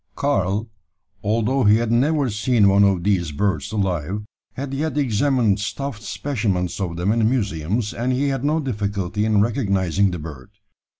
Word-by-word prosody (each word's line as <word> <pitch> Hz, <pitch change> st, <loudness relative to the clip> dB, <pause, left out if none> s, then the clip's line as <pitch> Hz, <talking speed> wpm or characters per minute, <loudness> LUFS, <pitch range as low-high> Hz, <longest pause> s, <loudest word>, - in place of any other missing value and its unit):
Karl, 105 Hz, -6 st, 0 dB, 0.6 s
although 115 Hz, +5 st, +1 dB
he 105 Hz, +1 st, +6 dB
had 115 Hz, 0 st, 0 dB
never 135 Hz, +2 st, +2 dB
seen 105 Hz, 0 st, +2 dB
one 100 Hz, +1 st, +5 dB
of 95 Hz, -3 st, +2 dB
these 90 Hz, -5 st, +1 dB
birds 80 Hz, -2 st, -1 dB
alive, 95 Hz, -1 st, -2 dB, 0.3 s
had 135 Hz, +1 st, -5 dB
yet 150 Hz, +2 st, -2 dB
examined 120 Hz, -5 st, +2 dB
stuffed 115 Hz, +3 st, -4 dB
specimens 100 Hz, -9 st, -2 dB
of 85 Hz, -4 st, -3 dB
them 90 Hz, +4 st, +1 dB
in 110 Hz, -1 st, +2 dB
museums, 105 Hz, -2 st, -1 dB
and 120 Hz, +2 st, -1 dB
he 135 Hz, +3 st, +1 dB
had 135 Hz, -2 st, -2 dB
no 150 Hz, +3 st, +1 dB
difficulty 105 Hz, -, -2 dB
in 105 Hz, -2 st, +3 dB
recognising 100 Hz, -, +1 dB
the 90 Hz, -, -4 dB
bird. 75 Hz, -5 st, -9 dB
105 Hz, 160 wpm, -22 LUFS, 95-125 Hz, 0.6 s, he